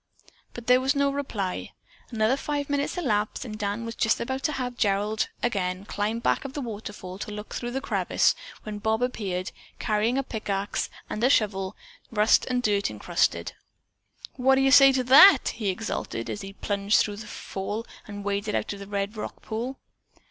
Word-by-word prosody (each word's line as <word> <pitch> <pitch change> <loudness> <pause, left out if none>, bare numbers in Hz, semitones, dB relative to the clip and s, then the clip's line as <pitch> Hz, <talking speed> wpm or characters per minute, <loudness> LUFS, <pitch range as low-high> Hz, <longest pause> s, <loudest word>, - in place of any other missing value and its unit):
But 240 - -8
there 250 +1 +5
was 270 +2 +1
no 280 0 +2
reply. 225 -10 -3 0.4
Another 225 +1 +2
five 285 0 -3
minutes 285 +4 -1
elapsed 215 -8 -1
and 215 -3 -6
Dan 210 +2 -3
was 230 - -4
just 225 -1 +1
about 265 +3 -3
to 305 - +1
have 250 -2 -3
Gerald 210 0 +1
again 190 -5 -1
climb 210 +2 -1
back 235 - +1
of 275 -1 -7
the 290 - -4
waterfall 205 -5 -7
to 210 - -5
look 210 0 -7
through 240 - -3
the 265 +2 -3
crevice, - - +2 0.3
when 210 -1 -6
Bob 220 +3 0
appeared, 190 -7 -2 0.3
carrying 220 +4 +1
a 275 - +1
pickaxe 205 -4 -2 0.2
and 215 - -4
a 255 - +5
shovel, 200 -6 +1 0.3
rusted 215 0 +3
and 250 -1 0
dirt 205 -2 +2
encrusted. - - 0 0.8
"What 265 +1 +4
do 265 - +2
you 270 0 +4
say 275 0 +9
to 260 -1 +1
that?" 275 +10 +8
he 215 -4 -2
exulted, 185 - -3
as 205 - -5
he 195 0 -8
plunged 200 +1 +1
through 205 -1 0
the 210 0 -8
fall 205 +3 -5 0.2
and 205 -1 -7
waded 205 +1 -1
out - - -1
of 200 - -9
the 200 - -8
red 200 +1 -2
rock 215 - -7
pool. 240 +5 -4
220 Hz, 185 wpm, -26 LUFS, 205-255 Hz, 0.8 s, say